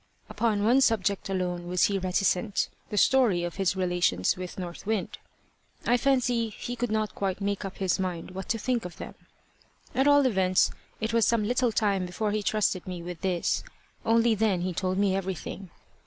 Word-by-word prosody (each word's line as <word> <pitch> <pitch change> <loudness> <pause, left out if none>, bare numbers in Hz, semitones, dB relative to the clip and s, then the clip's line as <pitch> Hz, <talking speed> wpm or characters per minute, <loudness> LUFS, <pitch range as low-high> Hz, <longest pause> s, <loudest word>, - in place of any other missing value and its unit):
Upon 215 -3 0
one 245 +5 +4
subject 200 -6 +1
alone 180 -2 -2
was 180 0 +1
he 200 -1 +2
reticent 190 +2 0 0.2
the 210 - -4
story 220 -7 +4
of 175 +1 -4
his 195 -1 +1
relations 175 - +1
with 180 0 -7
North 175 -2 -6
Wind. 220 -3 -2 0.7
I 245 - +4
fancy 245 -3 +1
he 240 +3 -6
could 245 0 -2
not 215 0 -1
quite 195 -1 -2
make 200 0 -2
up 195 -1 -6
his 190 -2 0
mind 180 -2 -3
what 190 0 -7
to 230 - +1
think 240 +1 -1
of 180 - -8
them. - - -7 0.8
At 265 +2 +2
all 285 -1 +6
events 190 -6 +3 0.3
it 220 +1 -2
was 230 -1 +4
some 230 -2 +2
little 245 0 +2
time 200 -4 +1
before 205 +4 -2
he 215 0 0
trusted 205 -3 0
me 180 -2 -5
with 175 -1 -7
this, 180 -3 0 0.4
only 230 0 +3
then 210 -4 +1
he 180 0 -2
told 185 +2 -1
me 200 -1 +2
everything. 190 0 -5
195 Hz, 185 wpm, -27 LUFS, 185-225 Hz, 0.8 s, all